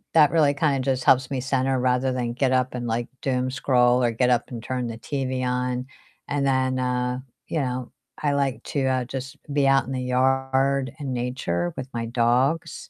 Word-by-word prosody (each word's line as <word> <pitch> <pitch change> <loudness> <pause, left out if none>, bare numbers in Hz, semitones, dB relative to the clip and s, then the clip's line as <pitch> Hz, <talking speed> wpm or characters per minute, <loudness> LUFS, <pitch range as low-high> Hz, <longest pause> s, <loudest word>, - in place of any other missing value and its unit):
that 150 -3 +6
really 150 -4 +4
kinda 140 -2 +1
just 130 -1 0
helps 130 0 +4
me 130 -2 -1
center 130 0 0
rather 125 +1 +1
than 120 -2 -2
get 130 +1 +1
up 130 0 +1
and, 120 -1 -3
like, 115 +1 -1
doom 130 -1 0
scroll 125 -1 +3
or 120 - +2
get 125 +2 +1
up 120 -1 +1
and 115 -2 -6
turn 125 0 -2
the 115 -1 -6
TV 130 +1 -3
on, 125 0 -1 0.4
and 145 -1 0
then, 130 -1 +1
uh, 125 0 -1 0.3
you 160 - -1
know, 125 -2 -3 0.3
I 145 -2 +1
like 140 -2 -1
to, 140 -2 -1
uh, 130 -1 +1
just 135 +1 -6 0.2
be 140 -1 +3
out 135 -2 +4
in 130 - -7
the 130 -1 -2
yard 135 +1 +1
and 140 -3 -3
nature 105 -9 -2
with 130 - -4
my 115 -1 -2
dogs, 125 +6 0
130 Hz, 200 wpm, -24 LUFS, 125-135 Hz, 0.4 s, that